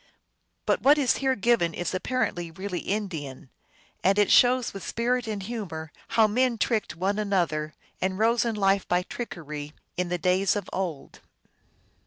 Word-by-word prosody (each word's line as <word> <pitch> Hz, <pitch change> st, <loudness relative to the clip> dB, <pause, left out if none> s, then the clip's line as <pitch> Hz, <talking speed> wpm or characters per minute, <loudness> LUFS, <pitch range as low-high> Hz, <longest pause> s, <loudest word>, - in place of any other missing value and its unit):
But -, -, +1 dB
what 285 Hz, +3 st, +6 dB
is 270 Hz, -5 st, +2 dB
here 265 Hz, -1 st, +1 dB
given 205 Hz, -6 st, +2 dB
is 175 Hz, -, -3 dB
apparently 185 Hz, -4 st, -1 dB
really 185 Hz, +2 st, -5 dB
Indian, 160 Hz, -11 st, -4 dB, 0.5 s
and 195 Hz, +2 st, +3 dB
it 205 Hz, -1 st, +3 dB
shows 250 Hz, 0 st, +5 dB
with 195 Hz, -, -7 dB
spirit 245 Hz, +1 st, -1 dB
and 210 Hz, -3 st, -3 dB
humor 180 Hz, -8 st, -5 dB, 0.3 s
how 225 Hz, -, +7 dB
men 240 Hz, +3 st, +1 dB
tricked 220 Hz, 0 st, 0 dB
one 195 Hz, +4 st, -1 dB
another, 170 Hz, -7 st, 0 dB, 0.3 s
and 185 Hz, 0 st, 0 dB
rose 230 Hz, +2 st, +3 dB
in 230 Hz, -2 st, -1 dB
life 195 Hz, -1 st, +2 dB
by 180 Hz, 0 st, +2 dB
trickery, 150 Hz, -10 st, -6 dB, 0.2 s
in 180 Hz, -1 st, -1 dB
the 180 Hz, -, 0 dB
days 185 Hz, +4 st, +2 dB
of 205 Hz, -3 st, -3 dB
old. 170 Hz, -8 st, -4 dB
195 Hz, 160 wpm, -26 LUFS, 175-230 Hz, 0.5 s, how